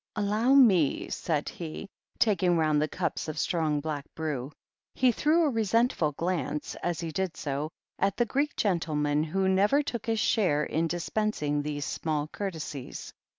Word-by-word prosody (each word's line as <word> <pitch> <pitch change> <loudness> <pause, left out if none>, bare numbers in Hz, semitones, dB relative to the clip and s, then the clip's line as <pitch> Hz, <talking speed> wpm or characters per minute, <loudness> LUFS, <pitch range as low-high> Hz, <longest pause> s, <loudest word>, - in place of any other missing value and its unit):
"Allow 215 +5 +2
me," 190 - +4
said 155 -4 -1
he, 165 +2 -6 0.3
taking 185 -5 +3
round 155 -2 +2
the 155 - +1
cups 170 -1 -3
of 155 - -5
strong, 155 -2 0
black 150 -2 -3
brew. 150 -4 -3 0.4
He 255 -1 +4
threw 310 +8 +3
a 300 - +2
resentful 225 - +1
glance, 160 -3 -2
as 175 -2 -1
he 165 -1 -4
did 185 0 -2
so, 145 +1 -3 0.3
at 195 0 +1
the 240 - +3
Greek 280 +5 -1
gentleman, 150 -6 +1
who 190 +5 0
never 205 +10 +3
took 235 -5 -5
his 225 -1 +1
share 180 -11 +2
in 160 +2 0
dispensing 170 -4 -1
these 145 -1 -3
small 150 -2 -2
courtesies. 160 -9 -6
170 Hz, 155 wpm, -28 LUFS, 150-210 Hz, 0.4 s, me